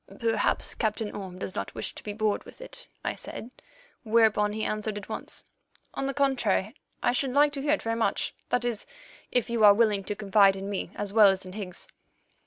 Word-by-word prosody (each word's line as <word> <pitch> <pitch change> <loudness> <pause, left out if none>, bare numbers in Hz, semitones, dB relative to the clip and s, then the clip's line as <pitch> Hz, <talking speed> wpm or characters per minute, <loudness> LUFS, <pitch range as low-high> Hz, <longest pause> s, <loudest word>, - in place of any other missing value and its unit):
"Perhaps 225 -3 +1
Captain 215 -1 -2
Orme 190 -3 -7
does 185 - -5
not - - -5
wish - - -2
to - - -9
be 210 - -4
bored 215 0 0
with - - -14
it," - - -9 0.2
I - - 0
said, 240 - -8 0.5
whereon 220 -2 +3
he 215 0 -3
answered 215 0 -2
at 205 - -8
once: - - -5 0.5
"On 275 - -2
the 275 - -2
contrary, 250 -7 +1 0.3
I - - +4
should 255 0 -1
like 290 +1 +5
to 275 - -3
hear 295 +2 +2
it 305 - -1
very 230 0 0
much—that 240 +1 -1
is, 235 -3 -2 0.4
if 245 -2 +1
you 235 -2 0
are 205 -1 +9
willing 210 -3 +2
to 205 - -2
confide 200 -1 +4
in 195 +1 -5
me 195 - -3
as 205 -1 -4
well 215 -2 +8
as 190 -1 +2
in 185 - -9
Higgs." 190 -3 -6
215 Hz, 205 wpm, -28 LUFS, 205-235 Hz, 0.5 s, are